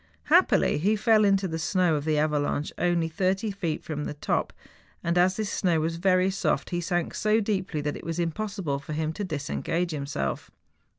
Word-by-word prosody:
Happily - - +4
he 205 +7 +2
fell 215 0 +4
into 195 -1 +3
the 160 -1 -4
snow 180 +1 +2
of 145 -1 -1
the 155 -1 +1
avalanche 150 -1 0
only 175 -1 +1
thirty 190 +5 0
feet 175 -6 -3
from 150 -2 -4
the - - -5
top, 145 - -1 0.5
and 170 +1 0
as 180 +1 +4
this 215 -1 -2
snow 175 -4 +1
was 165 +1 -1
very 185 +1 +3
soft, 195 - -1
he 175 0 -1
sank 175 0 -1
so 215 +1 +2
deeply 190 -7 -1
that 145 0 -2
it - - -9
was 165 0 -4
impossible 175 -3 -2
for 140 +2 -7
him 155 +1 -1
to 205 - -4
disengage 170 +1 -2
himself. 140 - -3
170 Hz, 190 wpm, -27 LUFS, 155-195 Hz, 0.5 s, Happily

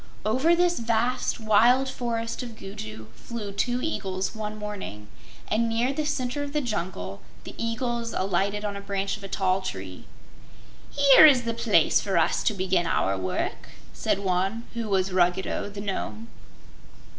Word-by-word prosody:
Over 260 +11 +3
this 350 0 +2
vast, 235 +3 0
wild 235 +5 +4
Forest 235 -3 -3
of 240 -3 -7
Gugu 110 - -8
flew 210 - -6
two 245 +5 -1
eagles, 190 -11 -2
one 215 -1 -5
morning, 200 - -7 0.4
and 230 +2 +1
near 235 +4 +1
the 300 +1 -2
center 265 -1 -2
of 285 0 -5
the 300 - +2
jungle 175 - -4 0.2
the - - -9
eagles 230 0 -2
alighted 195 +2 0
on 205 -1 -3
a 200 - -6
branch 200 0 -2
of 205 - -12
a - - -5
tall 190 -1 +1
tree. 95 - -7 0.8
"Here 285 +2 +8
is 260 -5 +5
the 230 0 -1
place 230 - +3
for - - -1
us - - +2
to 215 - +2
begin 185 -2 +1
our 95 -11 +1
work," 95 -1 -3 0.2
said - - 0
one, 195 +3 -1
who 230 -2 -4
was 190 -1 +1
Ruggedo, 185 +2 +1
the 200 0 -7
Nome. 210 +3 -4
210 Hz, 160 wpm, -26 LUFS, 190-240 Hz, 0.8 s, Here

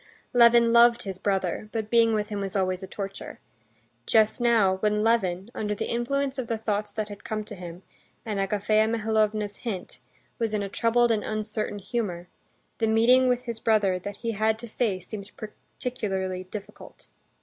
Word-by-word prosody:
Levin 235 -1 +6
loved 235 0 +6
his 190 -2 -6
brother, 195 +1 -1
but 220 -2 -4
being 230 -1 +4
with 210 0 -1
him 205 -1 -3
was 195 -1 -4
always 185 -1 0
a 190 - -7
torture. 195 0 -7 0.7
Just 220 +2 +3
now, 220 -6 +4
when 210 +1 +1
Levin, 200 -3 +1
under 210 -1 -2
the - - -3
influence 270 +3 -1
of 250 - -3
the 230 - -1
thoughts 210 -1 -2
that 215 0 -3
had 205 -1 -10
come 215 0 -3
to - - -10
him, 180 0 -9 0.4
and 210 -3 -2
Agafea 210 +2 +2
Mihalovna's 215 -2 0
hint, 205 -7 -5 0.4
was 225 -2 0
in 205 - -1
a 200 - -4
troubled 235 +3 +2
and 215 -2 +1
uncertain 215 -1 -3
humor, 195 -4 -3 0.5
the 225 - +2
meeting 240 +4 +5
with 250 0 +1
his 235 -3 -5
brother 205 -5 +2
that 200 +2 -6
he 230 - -3
had 220 +1 +1
to 235 +1 -9
face 205 -6 -2
seemed 205 -2 -7
particularly 195 -4 -4
difficult. 200 +2 -10
215 Hz, 175 wpm, -26 LUFS, 200-230 Hz, 0.7 s, Levin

